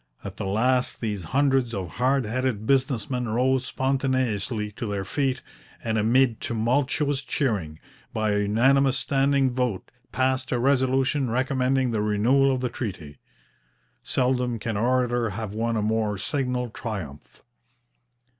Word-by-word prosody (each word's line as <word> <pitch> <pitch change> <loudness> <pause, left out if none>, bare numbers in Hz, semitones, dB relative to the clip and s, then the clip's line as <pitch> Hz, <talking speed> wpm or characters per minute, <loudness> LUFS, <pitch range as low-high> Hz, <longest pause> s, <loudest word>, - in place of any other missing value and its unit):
At 100 0 -7
the 100 - -3
last 125 +6 +1
these 105 -6 -3
hundreds 135 - +1
of 95 -2 -6
hard 130 +1 +2
headed 120 -1 -2
business 130 -4 +1
men 125 -3 -2
rose 130 +3 +1
spontaneously 130 -5 -1
to 110 +3 -5
their 100 -2 -3
feet, 135 +4 -1 0.4
and, 110 -1 -1
amid 115 +2 +2
tumultuous 135 +5 0
cheering, 100 - -2 0.3
by 110 -1 0
a 105 - +1
unanimous 130 +6 +3
standing 135 -1 +2
vote 125 -6 -2 0.2
passed 130 0 0
a 125 - +1
resolution 130 +1 +2
recommending 130 +1 +1
the 110 -2 0
renewal 120 +7 +3
of 130 -1 -1
the 125 - 0
treaty. 90 - -6 0.8
Seldom 125 -2 0
can 115 0 -3
orator 120 +1 +1
have 105 0 -5
won 115 +1 -1
a 105 - 0
more 110 -1 0
signal 125 0 -2
triumph. 100 - -7
125 Hz, 135 wpm, -25 LUFS, 110-130 Hz, 0.8 s, unanimous